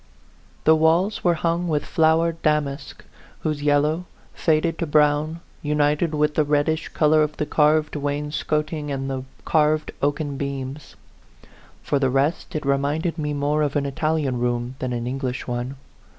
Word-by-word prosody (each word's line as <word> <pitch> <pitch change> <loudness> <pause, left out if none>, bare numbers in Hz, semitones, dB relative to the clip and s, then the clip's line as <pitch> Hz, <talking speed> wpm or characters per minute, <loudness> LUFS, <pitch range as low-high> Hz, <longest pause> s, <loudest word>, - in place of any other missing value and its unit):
The 160 - +6
walls 165 +6 +2
were 175 -2 +3
hung 170 +2 0
with 150 -3 0
flowered 165 +1 +2
damask, 150 -2 -1 0.4
whose 155 -2 -2
yel 145 0 +4
low, 155 +4 -1 0.3
faded 165 +1 +1
to 170 - -1
brown, 150 +2 +2 0.2
united 150 +2 +1
with 150 0 +2
the 155 - +2
reddish 150 +2 +1
color 155 0 +3
of 150 0 -1
the 150 - -1
carved 150 +1 +2
wainscoting 150 +1 -2
and 135 -1 -3
the 130 -1 -4 0.2
carved 155 0 +2
oaken 145 0 -1
beams. 140 0 -5 0.9
For 145 - 0
the 135 -1 +2
rest, 145 +7 0
it 150 - -2
re 140 0 +2
minded 160 +4 -1
me 150 -1 -1
more 145 +2 +1
of 150 -1 0
an 145 -1 +1
Italian 145 -2 -1
room 120 0 -1
than 130 -1 -3
an 120 -1 -3
English 125 0 -3
one. 120 +2 -3
150 Hz, 160 wpm, -23 LUFS, 140-155 Hz, 0.9 s, The